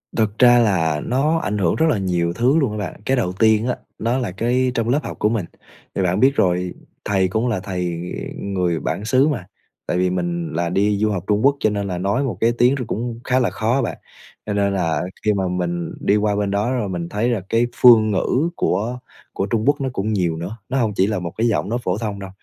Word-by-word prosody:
Thực 110 -2 0
ra 120 -1 +7
là 80 -9 +1
nó 145 +6 +1
ảnh 105 -9 -2
hưởng 85 -4 +1
rất 160 - +2
là 120 - +2
nhiều 90 -3 0
thứ 125 - +2
luôn 130 -7 +1
á 105 - -4
bạn. 100 -1 -5
Cái 135 0 +1
đầu 90 -6 0
tiên 110 +1 +4
á, 125 - 0 0.2
nó 120 +3 0
là 120 -8 -2
cái 125 +6 0
trong 115 0 0
lớp 140 +4 +3
học - - -7
của 105 - +2
mình, 110 -6 -1 0.5
thì 95 - 0
bạn 90 +2 +1
biết 135 +3 +4
rồi 90 -1 +1 0.3
thầy 95 -2 +2
cũng 110 +6 -1
là 110 -6 0
thầy, 90 -3 -3 0.4
ừ, - - -8
người 90 -4 -1
bản 105 - -3
xứ 130 +5 +3
mà, 120 - -2 0.4
tại 90 - 0
vì 90 0 +2
mình 85 -2 -2
là 85 +1 -1
đi 100 +3 +1
du 110 +1 +2
học 90 -4 -2
Trung 105 0 +2
Quốc 140 - +5
cho 110 - +2
nên 100 -1 -2
là 90 -2 -3
nói 100 +9 0
một 130 - -3
cái 115 +1 +4
tiếng 125 +3 +4
nó - - -2
cũng 115 +1 -3
khá 130 0 +2
là 125 - +2
khó 115 +4 0
á 135 - +2
bạn. - - -3 0.5
Cho 105 - -2
nên 100 -1 +1
là 85 -4 0 0.2
khi 105 - +4
mà 95 -2 -1
mình 85 -1 -2
đi 100 - +2
qua 105 -1 +1
bên 100 -1 -1
đó 105 +5 0
rồi 115 -6 -1
mình 85 -2 -4
thấy 110 +4 0
là 115 -6 0
cái 115 +1 +2
phương 110 -3 +6
ngữ 125 - +1
của 120 +4 -1 0.3
của 95 - -1
Trung 110 +1 -1
Quốc 145 -1 +3
nó 130 - -1
cũng 105 +1 -1
nhiều 85 -5 0
nữa, 90 +7 -6
nó 135 - -1
hông 115 -5 +1
chỉ 95 - +3
là 105 -3 -1
một 85 -2 -5
cái 115 +2 +2
giọng 105 -2 0
nói 120 +1 -1
phổ 90 -1 -1
thông 105 -3 -4
đâu 95 -1 -7
105 Hz, 260 wpm, -21 LUFS, 90-120 Hz, 0.5 s, ra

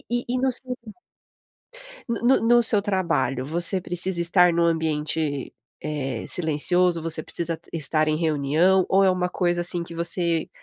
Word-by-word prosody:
e - - +1 0.2
e - - -1
no 260 0 0
seu 250 +1 -7 1.3
No 230 - -3
no 250 +3 +2
no 240 +1 +3
seu 215 -2 +4
trabalho, 165 - -2
você 175 +4 +1
precisa 175 +1 +2
estar 175 0 +3
num 170 - 0
ambiente, 155 -3 -3 0.3
eh, 135 -6 -5
silencioso, 170 +2 +2
você 160 -1 0
precisa 165 +1 -2
t 165 - -21
estar 155 -1 +1
em 155 - 0
reunião 160 +4 +1
ou 195 +1 +2
é 190 - +3
uma 180 -1 -2
coisa 175 -1 -2
assim 175 0 0
que 170 - -10
você 170 0 -1
170 Hz, 165 wpm, -22 LUFS, 155-185 Hz, 1.3 s, seu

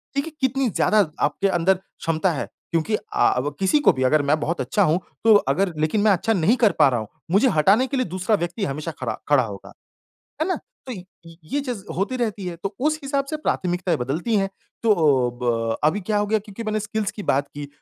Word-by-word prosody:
देखिए 280 +3 -1
कितनी 265 -1 +1
ज़्यादा 210 +1 +3 0.2
आपके 150 +7 +1
अंदर 190 0 +2
क्षमता 175 -1 -2
है 145 - -3 0.3
क्योंकि 165 +6 +1
अ - - -3 0.2
अ, 125 +3 +2
किसी 195 +10 +3
को - - +5
भी 130 -1 -2
अगर 150 +4 +3
मैं 145 +2 +1
बहुत 170 +3 -2
अच्छा 205 - +1
हूँ, 165 0 +2 0.2
तो 225 - +7
अगर 180 +1 +2
लेकिन 155 +7 +1
मैं 215 - +4
अच्छा 210 +4 +1
नहीं 190 +4 +3
कर 225 -4 +4
पा - - +7
रहा 125 -2 0
हूँ। 110 - -6 0.2
मुझे 205 +7 +4
हटाने 200 +9 +3
के 275 - -2
लिए 255 - +1
दूसरा 185 +4 0
व्यक्ति 185 +3 -3
हमेशा 150 +4 -4
खरा - - -3
खड़ा 145 -3 +5
होगा। 100 -4 -8 0.7
है - - +1
ना? 370 - +1 0.3
तो 255 - -5
य 185 -4 -8 0.4
ये 280 - -2
चीज़ 245 -8 -5
होती 200 +8 -1
रहती 215 -5 -2
है, 175 - -4
तो 195 +4 -5
उस 305 +3 +1
हिसाब 275 0 -1
से 310 - -1
प्राथमिकताएँ 180 - -1
बदलती 155 - -1
है। 195 -1 +1 0.3
तो 230 - +2
अ, 140 -9 +3
ब 115 -1 0
अभी 185 +7 +1
क्या 210 +2 0
हो 205 - 0
गया 220 +1 +2
क्योंकि 210 +1 -9
मैंने 215 0 -1
स्किल्स 210 0 -2
की 210 - -7
बात 140 +1 +1
की 145 -1 -6
195 Hz, 225 wpm, -23 LUFS, 155-220 Hz, 0.7 s, तो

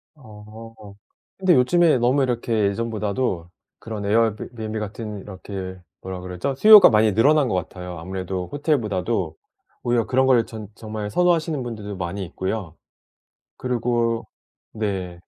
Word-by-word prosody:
어. 110 -3 -12 0.6
근데 185 -2 +3
요즘에 160 +5 +4
너무 130 +4 +3
이렇게 120 -2 -1 0.2
예전보다도 105 -4 -2 0.3
그런 110 -3 -6
에어비 110 0 +1
비앤비 110 -1 -4
같은 105 0 -6
이렇게 95 -1 -7 0.2
뭐라 95 -1 -6
그러죠? 90 +9 -3
수요가 215 +5 +9
많이 110 -2 +3
늘어난 145 +6 +4
것 100 - -1
같아요. 90 0 -5
아무래도 95 +1 -4
호텔보다도 110 - -1 0.5
오히려 120 -2 +1
그런 130 +1 +3
걸 125 -4 +4
전 110 -2 -8
정말 110 -2 -5
선호하시는 165 +1 +1
분들도 105 -4 -6
많이 90 +2 -4
있고요. 95 -1 -4 0.8
그리고 120 -2 -1 0.5
네. 95 -5 -3
110 Hz, 315 characters per minute, -23 LUFS, 95-125 Hz, 0.8 s, 수요가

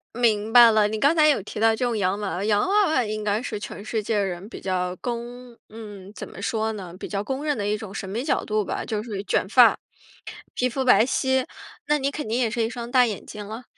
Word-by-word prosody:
明 220 -3 +1
白 235 -1 +9
了， 215 -1 +3
你 215 +1 -3
刚 285 +7 +3
才 305 -1 +5
有 290 - +3
提 210 - -7
到 225 0 +4
这 245 - -1
种 235 -2 -1
洋 195 0 0
娃 195 -5 -3
娃， 190 - -3
洋 210 - +2
娃 410 +1 +4
娃 265 -6 +2
应 215 0 -4
该 210 +1 0
是 210 - -4
全 205 0 -8
世 220 0 -2
界 210 +1 -1
人 190 0 -3
比 - - -9
较 180 -1 -2
公 240 0 -6
嗯， 205 -3 -10
怎 - - -7
么 195 - -11
说 220 +1 -1
呢？ 185 -5 -8
比 - - -6
较 200 -1 -3
公 265 +5 -4
认 300 -1 0
的 205 -2 -3
一 210 +1 0
种 205 -2 -9
审 195 -2 -5
美 225 +6 -3
角 295 - 0
度 215 -1 -1
吧， - - -3
就 215 -1 -3
是 205 -4 -5
卷 195 - 0
发， 240 +2 +6 0.8
皮 250 - 0
肤 260 +2 -2
白 245 -2 +5
皙， 265 0 +1 0.4
那 300 0 +3
你 275 0 -1
肯 295 -5 -5
定 225 - -1
也 240 -3 +1
是 235 0 -1
一 225 - 0
双 240 -1 -7
大 250 -1 +5
眼 215 -4 -5
睛 210 -1 -8
了？ 225 +4 -7
220 Hz, 280 characters per minute, -24 LUFS, 205-245 Hz, 0.8 s, 白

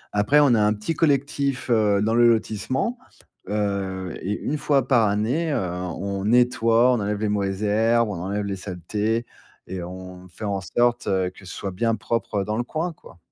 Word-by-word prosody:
Après 105 +9 +4
on 145 -4 +5
a 110 - +3
un 105 0 +3
petit 105 +10 -3
collectif, 140 -4 0
heu, 105 -3 +3
dans 110 +1 +1
le 120 0 +5
lotissement, 130 - -1 0.5
heu, 95 -4 -2
et 100 +3 -2
une 150 - -1
fois 135 -4 +1
par 115 -5 +4
année, 125 +11 0
heu, 140 - +1
on 90 +2 -4
nettoie, 120 +1 +4
on 120 - +1
enlève 105 0 -2
les 110 -1 0
mauvaises 100 -1 -1
herbes, 115 +2 +2
on 85 -4 -4
enlève 100 +2 -2
les 100 -1 -2
saletés 105 +5 -2 0.4
et 95 -1 -5
on 90 +1 -9
fait 100 +4 -8
en 100 -1 -1
sorte 120 +5 +1
heu, 95 -2 +1
que 95 - -17
ce - - -8
soit 95 - -4
bien 115 +4 0
propre 110 -4 -2
dans 105 +2 -2
le 120 - 0
coin, 160 +6 -3
quoi. 95 - -17
105 Hz, 195 wpm, -23 LUFS, 95-120 Hz, 0.5 s, on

